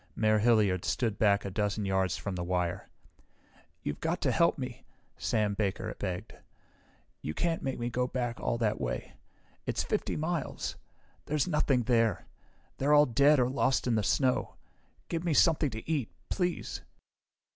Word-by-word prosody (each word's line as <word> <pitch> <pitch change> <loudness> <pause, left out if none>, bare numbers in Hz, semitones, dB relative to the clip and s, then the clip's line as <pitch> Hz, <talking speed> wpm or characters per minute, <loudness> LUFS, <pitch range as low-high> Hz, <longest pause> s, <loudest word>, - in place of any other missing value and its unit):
Mayor 110 -1 +3
Hilliard 105 -5 +3
stood 115 -5 -1
back 100 -2 +3
a 100 - -3
dozen 105 +1 -1
yards 95 -2 +1
from 95 +4 -4
the 90 -1 -3
wire. 90 -1 -2 0.9
"You've 75 - -3
got 165 +2 -1
to - - +2
help 170 -1 +3
me," 125 -3 -6 0.3
Sam 105 -2 0
Baker 105 +2 -2
begged. 90 -3 -4 0.9
"You 75 - -4
can't 170 -1 0
make 135 -1 -2
me 120 0 -3
go 125 +1 0
back 120 -2 -3
all 120 - -1
that 110 -2 0
way. - - -3 0.5
It's - - 0
50 - - -1
miles. 160 -1 -2 0.5
There's 150 0 +1
nothing 140 -6 +2
there. 115 -2 +2 0.5
They're 145 +2 +4
all 150 0 +7
dead 140 +4 +4
or 125 - +3
lost 130 0 +1
in 125 - +1
the 110 - +2
snow. 125 +5 +1 0.5
Give 165 0 -2
me 170 -4 +1
something 160 -2 +4
to 110 -2 -8
eat, 150 -8 0 0.2
please..." 180 -2 -2
115 Hz, 160 wpm, -30 LUFS, 100-145 Hz, 0.9 s, all